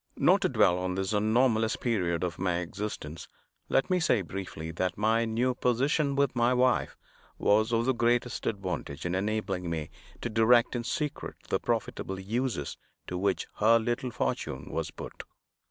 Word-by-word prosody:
Not - - +4
to - - +2
dwell 90 +1 +3
on 90 0 -2
this 95 +2 -1
anomalous 110 +1 +2
period 90 -8 0
of 90 -2 -3
my 90 -1 +1
existence, 85 -3 -5 0.4
let 135 - +2
me 180 - +3
say 125 - +2
briefly 85 -3 -6
that 90 +2 -2
my 110 +2 +2
new 120 +3 +1
position 140 +4 +1
with 140 -2 +1
my 120 +1 +3
wife 125 0 +2 0.4
was 110 +3 +3
of 115 0 +2
the 130 - +3
greatest 120 0 0
advantage 95 -8 -3
in 85 - -1
enabling 95 -2 -1
me 80 -2 -3 0.3
to - - -2
direct 115 +3 +4
in 120 - -2
secret 150 +4 -3
the - - +1
profitable 95 0 -2
uses 110 - -2 0.3
to 90 - -5
which 95 +1 0
her 115 +2 +5
little 120 +2 -1
fortune 65 - -3
was - - -2
put. - - -8
110 Hz, 165 wpm, -29 LUFS, 95-120 Hz, 0.4 s, her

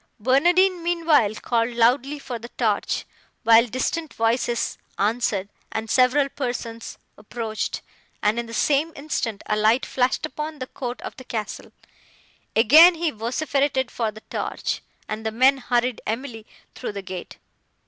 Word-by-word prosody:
Barnardine, 350 - +3
meanwhile, 330 -11 +2
called 230 +1 0
loudly 255 +5 +2
for 255 -4 -6
the 235 +2 -9
torch, 220 -5 -1 0.4
while 230 +1 +6
distant 300 +7 -2
voices 235 +1 0 0.2
answered, 205 -2 0 0.2
and 220 0 -3
several 260 +2 +4
persons 245 -4 -5 0.2
approached, 215 -1 -4 0.4
and, 215 +3 +2
in 235 - -4
the - - -9
same 300 +3 +2
instant, 245 -8 -3
a 210 - 0
light 220 +4 +3
flashed 255 0 0
upon 300 +3 -5
the 255 - -5
court 250 -1 -6
of - - -7
the 260 - -9
castle. 220 -4 -5 0.8
Again 310 +11 +8
he 330 -1 -1
vociferated 265 +3 -1
for 230 -2 -1
the 215 +1 -13
torch, - - -3 0.3
and 215 +1 -5
the 220 - 0
men 260 +4 +4
hurried 245 -1 0
Emily 225 -1 -4 0.3
through - - -5
the 200 -1 -6
gate. 185 -1 -8
245 Hz, 145 wpm, -23 LUFS, 225-280 Hz, 0.8 s, Again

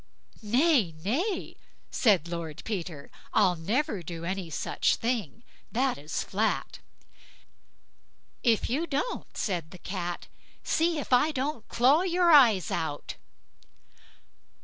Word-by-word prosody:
"Nay, 235 - +3
nay", 345 - -1 0.4
said 195 - +3
Lord 170 -3 -5
Peter, 175 -9 -5 0.2
"I'll 180 - +4
never 210 - -1
do 170 0 -7
any 185 -1 -3
such 155 - 0
thing, 230 - -3 0.3
that's 235 - -1
flat." 215 +3 -1 1.6
"If 230 -4 +2
you 300 +8 -1
don't", 295 - -3
said 175 -6 -2
the 180 - -11
Cat," 175 -1 -5 0.4
see 330 0 +1
if 285 - -2
I 250 +5 +5
don't 270 -4 -3
claw 265 +7 +4
your 355 -1 +3
eyes 235 - +6
out." 150 -3 -3
220 Hz, 110 wpm, -28 LUFS, 175-285 Hz, 1.6 s, eyes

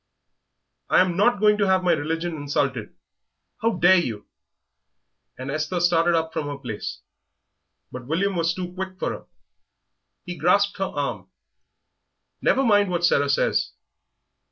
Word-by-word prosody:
"I - - +5
am 180 -2 +1
not 205 +3 +3
going 210 0 +3
to 200 - +2
have 190 -1 +2
my 180 - +3
religion 165 +2 -2
insulted! 140 -6 -2 0.7
How 230 +1 +1
dare 185 +1 +5
you?" 110 -11 -4 1.1
And 130 +2 -5
Esther 155 +4 -2
started 175 0 +3
up 160 0 -1
from 145 - -3
her 145 -1 -5
place; 115 -6 -6 0.9
but 125 -1 -8
William 190 +6 0
was 170 0 0
too 180 -1 -6
quick 190 0 -6
for - - -2
her. - - -8 1.0
He 175 - -6
grasped 200 +4 +2
her 195 - +1
arm. 145 -6 -4 1.1
"Never 270 - +2
mind 205 -5 +3
what 175 -1 0
Sarah 145 -4 +2
says." 140 - +1
175 Hz, 145 wpm, -23 LUFS, 145-190 Hz, 1.1 s, I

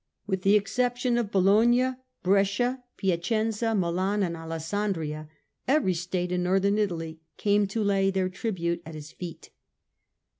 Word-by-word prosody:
With 190 -2 -2
the 195 +2 +4
exception 245 +4 +1
of 225 -4 -2
Bologna, 225 +7 +4 0.3
Brescia, 200 +7 +2
Piacenza, 215 +5 0
Milan 190 +2 0
and 170 -2 -1
Alessandria, 165 -1 -3 0.4
every 265 -9 +3
state 180 +1 -2
in 180 0 0
Northern 195 +3 +2
Italy 165 -6 -2 0.2
came 205 0 +2
to 215 +3 -2
lay 195 -1 +2
their 190 -1 0
tribute 180 -4 -2
at 160 -1 -9
his 155 +1 -9
feet. 175 -3 -9
195 Hz, 135 wpm, -27 LUFS, 175-210 Hz, 0.4 s, the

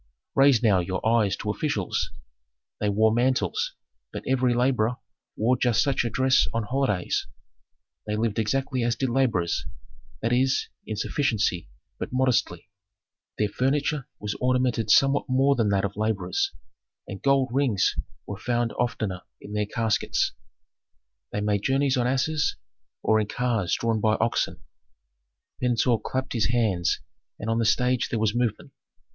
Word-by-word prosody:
"Raise 135 -4 +5
now 100 -5 +4
your 95 +1 -3
eyes 110 -4 +3
to - - -3
officials. - - -1 0.7
They 105 - 0
wore 110 +2 +3
mantles, 130 - +1 0.4
but - - -6
every 130 -2 +2
laborer 125 -2 +2 0.4
wore 120 +4 +2
just 120 -3 +3
such 135 -2 +1
a 120 - -1
dress 130 +2 +3
on 115 - 0
holidays. 105 -5 -1 0.8
They 105 - -1
lived 110 0 -1
exactly 130 +4 0
as 120 0 +1
did 130 - -1
laborers, 115 -9 +1 0.6
that 115 +2 +1
is, 130 +2 +1 0.2
in 110 - -3
sufficiency, 105 - 0 0.3
but - - -4
modestly. 125 -9 0 0.7
Their 105 -1 +1
furniture 135 +5 0
was 105 -1 -4
ornamented 125 -4 +1
somewhat 135 +4 +4
more 135 +2 +4
than 115 -5 +1
that 100 0 +1
of 100 - -4
laborers, 105 -4 -1 0.6
and 100 - -7
gold 135 -1 +3
rings 125 -9 +2 0.3
were 100 - -6
found 120 0 -1
oftener 110 -6 -1 0.2
in 105 - -10
their 105 -1 0
caskets. 110 -1 0 1.0
They 105 - -2
made 105 -1 0
journeys 135 +3 +2
on 125 -1 +1
asses, 145 +4 +1 0.5
or 110 0 +3
in 105 - -1
cars 115 -6 0
drawn 115 -2 0
by 110 0 +3
oxen." 115 +2 -1 1.0
Pentuer 120 -1 +2
clapped 130 +5 -3
his 110 -4 +1
hands 110 -8 +1 0.4
and 110 - -3
on 115 - +1
the 115 - +1
stage 125 +3 +2
there 115 - -1
was 110 -1 +1
movement. 120 -2 -1
115 Hz, 150 wpm, -25 LUFS, 105-130 Hz, 1.0 s, Raise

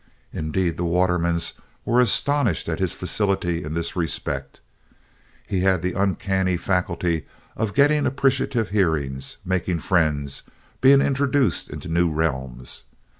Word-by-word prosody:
Indeed 85 +1 -1
the 90 - -2
Watermans 85 -1 +1 0.3
were 120 +2 +4
astonished 125 - +2
at - - -2
his - - 0
facility 95 -4 -1
in 75 +1 -5
this 85 0 -2
respect. 70 -5 -2 0.9
He 95 - -1
had 95 -2 +2
an 90 - -1
uncanny 95 -1 0
faculty 85 -2 -1 0.3
for 110 - 0
getting 145 +7 +3
appreciative 130 -4 +1
hearings, 75 -9 0
making 90 -2 -1
friends, 75 -6 +1 0.4
being 135 +1 +7
introduced 140 - +1
into - - -7
new 85 +1 +2
realms. 65 -6 -2
90 Hz, 125 wpm, -23 LUFS, 80-105 Hz, 0.9 s, being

